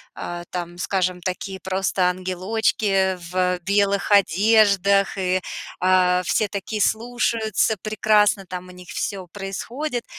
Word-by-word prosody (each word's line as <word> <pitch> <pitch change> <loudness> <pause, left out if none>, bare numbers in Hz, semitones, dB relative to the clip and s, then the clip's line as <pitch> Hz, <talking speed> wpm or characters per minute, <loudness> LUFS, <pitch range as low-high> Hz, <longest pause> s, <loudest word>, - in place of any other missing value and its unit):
а, 175 0 -6
там, 175 -1 -5
скажем, 185 -1 -1
такие 190 +1 -4
просто 190 0 -1
ангелочки 190 +1 0
в 180 -1 +1
белых 200 +2 +1
одеждах 200 +1 +4
и, 185 0 0 0.4
а, 180 0 +3
все 215 - +1
такие 205 +2 -4
слушаются, 225 -1 +1
прекрасно 215 -2 +2
там 180 0 -7
у - - -12
них 180 -1 -13
всё 190 -3 -4
происходит, 230 - -5
195 Hz, 120 wpm, -22 LUFS, 180-210 Hz, 0.4 s, одеждах